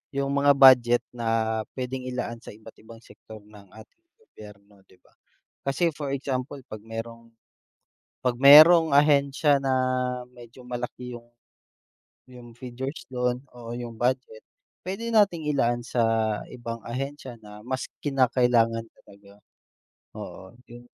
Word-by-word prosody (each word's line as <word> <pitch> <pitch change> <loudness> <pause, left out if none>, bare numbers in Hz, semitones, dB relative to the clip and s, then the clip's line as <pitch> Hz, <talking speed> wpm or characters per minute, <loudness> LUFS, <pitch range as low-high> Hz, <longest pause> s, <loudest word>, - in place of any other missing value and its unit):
yung 140 0 -1
mga 140 0 +4
budget 125 -3 +6
na 115 -2 -1 0.2
puwedeng 130 0 -5
ilaan 125 -2 -5
sa 115 - -21
iba't-ibang 110 +1 -15
sektor 110 -1 -14
ng 105 -1 -17
ating 110 - -17 0.2
gobyerno 105 - -16
'di - - -22
ba? - - -27 0.6
Kasi 165 +5 +1
for 140 -1 -5
example 135 0 -4
pag 110 -1 -9
merong 115 +1 -8 0.9
pag 125 -1 +1
merong 155 +4 +8
ahensya 145 0 +3
na 135 - -1 0.6
medyo 120 +1 -15
malaki 125 0 -6
yung 120 0 -15 1.0
yung 120 -2 -13
figures 130 +3 -7
don 125 0 -1
oo 120 -1 -8
yung 120 -2 -7
budget, 125 -2 -1 0.5
puwede 210 +5 -4
nating 185 -9 +2
ilaan 120 -4 0
sa 125 0 -4 0.5
ibang 115 -2 -7
ahensya 135 +1 -6
na 105 0 -12
mas 130 +1 -4 0.2
kinakailangan 120 -4 +2 0.2
talaga 100 0 -19 0.8
oo 95 - -10 0.2
yung 120 +1 -13
125 Hz, 125 wpm, -25 LUFS, 115-140 Hz, 1.0 s, merong